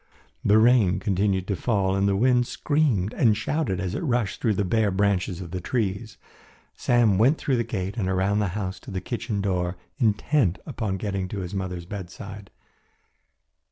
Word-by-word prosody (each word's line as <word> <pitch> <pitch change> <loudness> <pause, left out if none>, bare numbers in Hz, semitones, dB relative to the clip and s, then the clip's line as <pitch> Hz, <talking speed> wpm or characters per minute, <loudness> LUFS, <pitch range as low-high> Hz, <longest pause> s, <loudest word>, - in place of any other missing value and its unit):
The 105 - +5
rain 110 -5 +4
continued 95 -1 0
to 100 - +1
fall 95 -3 0
and 100 0 +2
the 100 - +2
wind 125 +3 +3
screamed 135 -10 0
and 110 -4 +3
shouted 110 - -1
as 95 -2 -2
it - - -2
rushed 120 - -1
through 110 -3 +2
the 100 - 0
bare 110 +2 +2
branches 95 -2 0
of 85 -2 -8
the 90 0 -4
trees. 105 0 -2 0.6
Sam 115 -6 +2
went 135 +8 +4
through 135 -3 0
the 120 - +1
gate 95 -1 -4
and 95 -4 -1
around 95 +2 +1
the 105 - +1
house 95 -2 -3
to - - -12
the 95 -2 -3
kitchen 110 +1 -3
door 90 -2 -1 0.2
intent 110 - +2
upon 105 -5 -3
getting 95 -1 -3
to 100 +1 -5
his 90 +1 -6
mother's 90 -3 -4
bedside. 100 +1 -8
100 Hz, 180 wpm, -25 LUFS, 95-115 Hz, 0.6 s, The